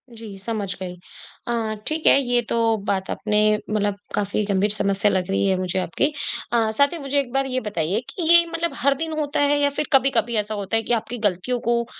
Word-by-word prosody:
जी, 215 -3 -9
समझ 205 -3 -3
गई। 180 -1 -4 0.5
अ, 225 -2 -1
ठीक 310 0 -1
है, - - +7
ये 245 -1 +1
तो 230 -1 +2
बात 190 -1 -1
आपने 210 0 0 0.3
मतलब 205 -1 0 0.2
काफ़ी 205 +1 0
गंभीर 200 0 +1
समस्या 200 0 +2
लग 185 0 -1
रही 195 - +1
है 190 - +2
मुझे 185 0 -1
आपकी। 175 - 0 0.5
अ, 225 -2 +2
साथ 280 +7 +2
ही - - -4
मुझे 275 0 0
एक 260 -4 -3
बार 270 0 +1
ये 255 -1 -1
बताइए 185 +1 -1
कि 335 -4 -3
ये 340 0 +7
मतलब 335 0 -1
हर 275 +2 +2
दिन 320 +2 -3
होता 290 -1 -1
है 290 0 +3
या 285 - +3
फिर 285 - -3
कभी-कभी 250 -3 +3
ऐसा 210 +1 -1
होता 205 +1 -1
है 225 - -1
कि 240 - -1
आपकी 235 +2 -2
गलतियों 205 +7 -2
को 235 0 +2
225 Hz, 220 wpm, -22 LUFS, 200-270 Hz, 0.5 s, है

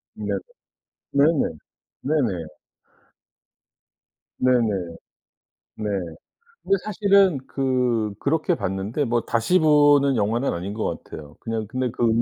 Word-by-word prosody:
네. - - -6 0.9
네네. 140 +3 +5 0.7
네네. 125 - 0 2.0
네네. 105 -9 +1 0.8
네. 110 - -6 0.8
근데 195 - +2
사실은 200 -5 +3
그 125 -5 0
그렇게 155 +2 +1
봤는데 100 +8 -2
뭐 120 -1 +1
다시 115 +14 +1
보는 145 -3 +5
영화는 115 +4 0
아닌 90 +4 -4
것 110 - -3
같아요. 75 -1 -11
그냥 115 -2 -4
근데 130 0 -2
그, 120 0 0
125 Hz, 190 characters per minute, -23 LUFS, 105-145 Hz, 2.0 s, 네네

